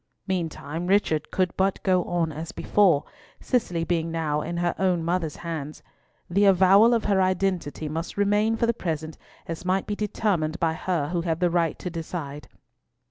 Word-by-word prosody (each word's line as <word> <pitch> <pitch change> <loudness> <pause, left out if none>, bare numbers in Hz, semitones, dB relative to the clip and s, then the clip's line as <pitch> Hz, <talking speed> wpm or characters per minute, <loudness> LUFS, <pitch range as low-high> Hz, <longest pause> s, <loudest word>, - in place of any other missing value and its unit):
Meantime, 170 -3 -3
Richard 180 -6 +2
could 185 -2 0
but 190 0 +1
go 185 -2 +3
on 170 -2 0
as 155 +2 -6
before, 180 -8 +3 0.4
Cicely 180 -9 0
being 165 -1 -1
now 155 -2 -1
in 170 - -4
her 175 0 0
own 180 -3 +1
mother's 170 -2 -1
hands. 155 -3 -6 0.4
The 200 +4 +2
avowal 195 +5 +6
of 230 - -1
her 195 -2 +3
identity 185 -5 -1
must 160 +5 -5
remain 205 +2 +2
for 230 - +2
the 235 - +2
present 160 -6 -4 0.3
as 165 0 -6
might 185 +1 0
be 210 - -3
determined 190 -6 -1
by 165 -1 +1
her 160 -3 -2
who 175 -1 -1
had 165 -1 -1
the 175 -1 +2
right 170 -2 +1
to 180 - -5
decide. 160 -3 -6
175 Hz, 175 wpm, -25 LUFS, 160-190 Hz, 0.4 s, avowal